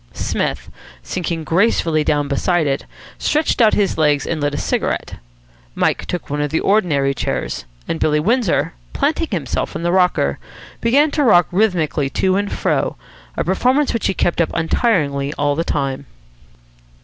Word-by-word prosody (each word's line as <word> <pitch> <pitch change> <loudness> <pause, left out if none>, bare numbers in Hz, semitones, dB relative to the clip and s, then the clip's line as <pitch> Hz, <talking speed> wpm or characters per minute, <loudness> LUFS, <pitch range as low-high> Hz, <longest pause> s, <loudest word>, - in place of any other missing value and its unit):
Psmith, - - -3 0.3
sinking 170 -2 -3
gracefully 165 -3 +2
down 145 -1 +1
beside 160 +4 +1
it, 135 -1 -1 0.3
stretched 305 -4 +1
out 220 -2 +5
his 200 -5 0
legs 150 -2 +2
and 160 -2 -2
lit 145 0 0
a - - -3
cigarette. - - -2 0.6
Mike - - 0
took 180 - -4
one 145 +1 -2
of 150 - -1
the 160 - 0
ordinary 155 -10 +2
chairs; 125 - -3 0.2
and 165 - -2
Billy 150 -1 +2
Windsor, 220 - +1 0.2
planting - - 0
himself - - -3
in - - -4
the 175 - +1
rocker, 180 -1 +2 0.4
began 280 +6 +3
to 295 - +1
rock 175 -9 +5
rhythmically 175 -8 +1
to 185 +6 +1
and 200 0 -1
fro, - - 0 0.4
a - - +1
performance 255 - +1
which 230 - 0
he 190 - -1
kept 175 0 +1
up 165 - +1
untiringly 155 - 0
all 145 0 +1
the 165 +3 -1
time. 140 -4 -2
170 Hz, 160 wpm, -19 LUFS, 145-200 Hz, 0.6 s, out